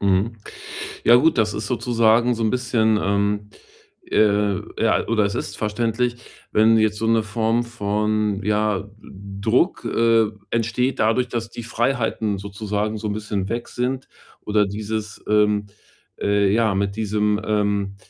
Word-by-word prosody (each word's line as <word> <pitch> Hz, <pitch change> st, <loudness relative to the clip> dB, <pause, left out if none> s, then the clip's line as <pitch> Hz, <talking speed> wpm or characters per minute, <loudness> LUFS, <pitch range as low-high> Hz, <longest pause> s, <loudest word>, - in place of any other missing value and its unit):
Mhm. 100 Hz, +3 st, +1 dB, 0.7 s
Ja 120 Hz, -, +7 dB
gut, 155 Hz, +2 st, +3 dB
das 105 Hz, -2 st, +2 dB
ist 110 Hz, +1 st, -4 dB
sozusagen 120 Hz, 0 st, +2 dB
so 115 Hz, -, -3 dB
'n 110 Hz, -, +2 dB
bisschen, 115 Hz, -3 st, +1 dB
ähm, 100 Hz, +1 st, 0 dB, 0.6 s
äh 105 Hz, -2 st, +2 dB, 0.2 s
ja, -, -, +2 dB
oder 110 Hz, -3 st, +2 dB
es 100 Hz, -, -1 dB
ist -, -, -4 dB
verständlich, 115 Hz, +3 st, -1 dB, 0.4 s
wenn 110 Hz, +1 st, +5 dB
jetzt 110 Hz, -1 st, +2 dB
so 110 Hz, -, -1 dB
'ne 115 Hz, 0 st, +3 dB
Form 110 Hz, +2 st, 0 dB
von, 105 Hz, -2 st, -1 dB
ja, 105 Hz, -1 st, 0 dB
D 100 Hz, -1 st, -11 dB
Druck, 120 Hz, -, +1 dB
äh, 115 Hz, -1 st, +3 dB, 0.2 s
entsteht 115 Hz, +3 st, 0 dB
dadurch, 115 Hz, +3 st, +2 dB
dass 115 Hz, -1 st, -4 dB
die 120 Hz, -, -7 dB
Freiheiten 115 Hz, -3 st, -1 dB
sozusagen 105 Hz, +2 st, -3 dB
so 105 Hz, -, -5 dB
'n -, -, -1 dB
bisschen 105 Hz, -2 st, -3 dB
weg 120 Hz, +2 st, -3 dB
sind 130 Hz, +2 st, -3 dB, 0.3 s
oder 105 Hz, -1 st, +1 dB
dieses, 105 Hz, +1 st, -5 dB
ähm, 105 Hz, -1 st, +2 dB, 0.5 s
äh 100 Hz, -1 st, +2 dB
ja, 110 Hz, -2 st, +2 dB
mit 100 Hz, +1 st, -1 dB
diesem, 105 Hz, -1 st, 0 dB
ähm, 100 Hz, -2 st, 0 dB
110 Hz, 150 wpm, -22 LUFS, 105-115 Hz, 0.7 s, Ja